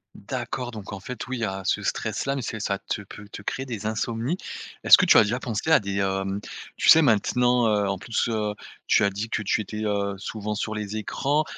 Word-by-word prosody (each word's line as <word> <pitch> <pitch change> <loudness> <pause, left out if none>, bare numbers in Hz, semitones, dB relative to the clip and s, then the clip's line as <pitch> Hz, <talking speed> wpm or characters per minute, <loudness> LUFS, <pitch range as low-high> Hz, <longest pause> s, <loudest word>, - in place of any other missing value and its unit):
Mmh, - - -12
d'accord, 125 0 -3
donc 105 -3 -8
en 100 - -6
fait, 125 +6 -7
oui, 130 0 -3
il - - -5
y - - +2
a 95 -1 -4
ce - - +1
stress-là, 135 0 -1
mais 135 - -2
c'est 110 -2 -4
ça 100 -1 -1
te - - -4
peut 105 +1 -11
te 100 - -8
créer 130 +5 -3
des 115 -5 -6
insomnies. 115 +7 -1 0.5
Est-ce - - +10
que - - +3
tu - - +7
as - - +8
déjà 115 +4 -1
pensé 120 +4 -3
à 160 - +7
des, 100 -1 -4
hem, 95 0 -1 0.4
tu - - +2
sais 160 - +9
maintenant, 125 -1 +3
heu, 105 -2 +2
en 100 0 -1
plus, 110 +5 -1
heu, 105 -2 -1 0.3
tu - - +4
as 100 - +4
dit 100 +3 -5
que 110 - -1
tu 105 +1 +1
étais, 105 +1 -5
heu, 100 -1 -1
souvent 105 +1 -4
sur 110 +1 -3
les 105 0 -4
écrans, 140 +8 0
110 Hz, 245 wpm, -25 LUFS, 100-120 Hz, 0.5 s, Est-ce